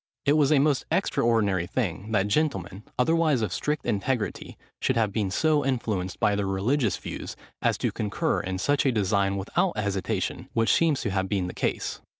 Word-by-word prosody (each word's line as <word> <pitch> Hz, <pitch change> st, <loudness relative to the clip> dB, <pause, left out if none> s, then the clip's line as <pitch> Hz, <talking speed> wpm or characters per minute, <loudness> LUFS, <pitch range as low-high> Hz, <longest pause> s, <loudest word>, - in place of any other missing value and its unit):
It 145 Hz, -, +4 dB
was 150 Hz, -1 st, +3 dB
a 150 Hz, -, +5 dB
most 140 Hz, -1 st, +2 dB
extraordinary 100 Hz, -7 st, +1 dB
thing, 105 Hz, -2 st, -3 dB
that 100 Hz, -2 st, +2 dB
gentlemen, 100 Hz, -, -1 dB, 0.2 s
otherwise 155 Hz, -2 st, +2 dB
of 100 Hz, -4 st, -2 dB
strict 150 Hz, 0 st, -2 dB
integrity, 105 Hz, 0 st, -2 dB, 0.2 s
should 130 Hz, -, +1 dB
have 110 Hz, -3 st, +2 dB
been 105 Hz, -4 st, 0 dB
so 150 Hz, +8 st, +2 dB
influenced 110 Hz, -8 st, -2 dB
by 105 Hz, -, +3 dB
their 100 Hz, -1 st, -1 dB
religious 105 Hz, +4 st, +1 dB
views, -, -, -7 dB, 0.3 s
as -, -, +2 dB
to -, -, -1 dB
concur 105 Hz, -3 st, -1 dB
in 95 Hz, 0 st, -3 dB
such 145 Hz, +9 st, +1 dB
a 135 Hz, -, +3 dB
design 100 Hz, -2 st, +1 dB
without 170 Hz, -, 0 dB
hesitation, 100 Hz, -2 st, -2 dB
which 115 Hz, 0 st, +3 dB
seems 160 Hz, -4 st, +2 dB
to 105 Hz, -, -2 dB
have 95 Hz, 0 st, -1 dB
been 95 Hz, -3 st, 0 dB
the 90 Hz, -, -5 dB
case. -, -, -2 dB
110 Hz, 180 wpm, -26 LUFS, 95-140 Hz, 0.3 s, a